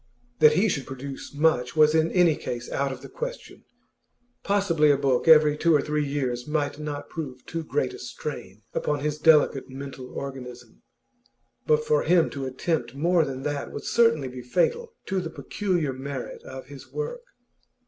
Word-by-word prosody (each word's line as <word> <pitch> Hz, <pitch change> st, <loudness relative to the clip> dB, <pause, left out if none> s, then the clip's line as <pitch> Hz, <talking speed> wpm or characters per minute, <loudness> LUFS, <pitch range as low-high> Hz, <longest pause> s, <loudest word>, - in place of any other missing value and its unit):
That 150 Hz, 0 st, +7 dB
he 190 Hz, +8 st, +3 dB
should 140 Hz, -9 st, -2 dB
produce 135 Hz, +1 st, -7 dB
much 145 Hz, -4 st, +1 dB
was 155 Hz, 0 st, +5 dB
in 160 Hz, 0 st, +2 dB
any 175 Hz, -4 st, +4 dB
case 120 Hz, -3 st, -5 dB
out 140 Hz, 0 st, 0 dB
of 130 Hz, -1 st, -8 dB
the -, -, -7 dB
question; -, -, -7 dB, 0.8 s
possibly 190 Hz, -7 st, +3 dB
a 145 Hz, -, +5 dB
book 135 Hz, -1 st, +1 dB
every 155 Hz, -2 st, +7 dB
two 165 Hz, +1 st, +3 dB
or 145 Hz, -, +4 dB
three 150 Hz, 0 st, 0 dB
years 130 Hz, -3 st, -2 dB
might 150 Hz, -1 st, -1 dB
not 145 Hz, -1 st, -5 dB
prove 135 Hz, -6 st, -7 dB
too 165 Hz, -1 st, -4 dB
great 140 Hz, -4 st, -1 dB
a -, -, -9 dB
strain -, -, -7 dB
upon 150 Hz, -1 st, -1 dB
his 150 Hz, +1 st, -2 dB
delicate 150 Hz, -4 st, +4 dB
mental 135 Hz, -1 st, -8 dB
organism, 125 Hz, -4 st, -8 dB, 0.9 s
but 460 Hz, -1 st, +3 dB
for 460 Hz, 0 st, +3 dB
him 175 Hz, -2 st, +3 dB
to 135 Hz, -2 st, -4 dB
attempt 130 Hz, -2 st, -2 dB
more 170 Hz, +3 st, +3 dB
than 135 Hz, -2 st, -5 dB
that 145 Hz, -1 st, -3 dB
would -, -, -6 dB
certainly 230 Hz, -, +3 dB
be 125 Hz, 0 st, -7 dB
fatal 455 Hz, -, 0 dB
to 190 Hz, -1 st, -1 dB
the 165 Hz, -, -5 dB
peculiar 170 Hz, -3 st, -2 dB
merit 135 Hz, 0 st, -6 dB
of 130 Hz, 0 st, -9 dB
his 140 Hz, -1 st, -12 dB
work. 475 Hz, +2 st, -4 dB
150 Hz, 175 wpm, -26 LUFS, 135-165 Hz, 0.9 s, That